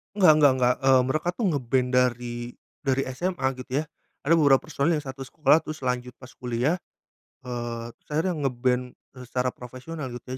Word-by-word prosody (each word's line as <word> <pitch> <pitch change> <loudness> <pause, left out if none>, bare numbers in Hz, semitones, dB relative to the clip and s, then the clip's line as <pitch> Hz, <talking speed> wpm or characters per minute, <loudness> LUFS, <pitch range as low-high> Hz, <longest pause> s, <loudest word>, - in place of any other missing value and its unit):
Enggak 185 -6 +7
enggak 145 -3 +6
enggak, 125 0 +3
eee, 130 -1 +6
mereka 155 +5 -1
tuh 220 +4 -3
ngeband 125 -1 0
dari 125 -1 +1 0.5
dari 135 -1 +1
SMA 175 -5 -1
gitu 125 0 -10
ya. - - -1 0.4
Ada 165 - +5
beberapa 140 -4 +5
personil 155 +3 0
yang 150 - -12
satu 135 0 -6
sekolah 150 +4 +3
terus 155 0 -6
lanjut 125 -1 -2
pas 125 - -11
kuliah, 125 +6 0 0.7
eee, 120 -2 -4
terus - - -39
akhirnya 175 +3 +1
ngeband 125 0 +1 0.4
secara 125 +1 -1
profesional 130 +5 -8
gitu 120 - -8
130 Hz, 170 wpm, -26 LUFS, 125-150 Hz, 0.7 s, Enggak